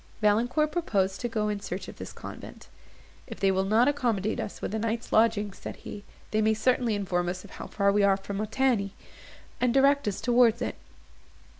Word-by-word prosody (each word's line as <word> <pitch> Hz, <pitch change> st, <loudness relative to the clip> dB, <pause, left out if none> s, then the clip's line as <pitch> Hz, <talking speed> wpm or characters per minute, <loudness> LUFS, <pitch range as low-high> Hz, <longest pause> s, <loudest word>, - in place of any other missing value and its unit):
Valancourt 240 Hz, +8 st, +2 dB
proposed 200 Hz, -, 0 dB
to 245 Hz, -, -1 dB
go 215 Hz, -2 st, -1 dB
in 210 Hz, -1 st, -1 dB
search 190 Hz, -1 st, -5 dB
of -, -, -10 dB
this -, -, -7 dB
convent. -, -, -10 dB, 0.6 s
"If -, -, -8 dB
they 195 Hz, -1 st, +3 dB
will 190 Hz, 0 st, +1 dB
not 220 Hz, +6 st, +3 dB
accommodate 235 Hz, -8 st, 0 dB
us -, -, -5 dB
with -, -, -4 dB
a 220 Hz, -, -1 dB
night's 230 Hz, +1 st, -2 dB
lodging," 215 Hz, -2 st, +3 dB
said -, -, -8 dB
he, 205 Hz, -, -9 dB, 0.3 s
"they 215 Hz, -, +2 dB
may 220 Hz, 0 st, +3 dB
certainly 245 Hz, -1 st, +1 dB
inform 180 Hz, -3 st, -1 dB
us 185 Hz, +1 st, -5 dB
how -, -, -9 dB
far 200 Hz, -1 st, +2 dB
we 205 Hz, +1 st, +2 dB
are 200 Hz, -1 st, +4 dB
from 195 Hz, 0 st, -6 dB
Montigny, 215 Hz, -2 st, 0 dB, 0.6 s
and 250 Hz, -, +2 dB
direct 275 Hz, 0 st, +4 dB
us 200 Hz, -, -1 dB
towards 240 Hz, -2 st, +4 dB
it." -, -, -2 dB
215 Hz, 190 wpm, -28 LUFS, 200-240 Hz, 0.6 s, are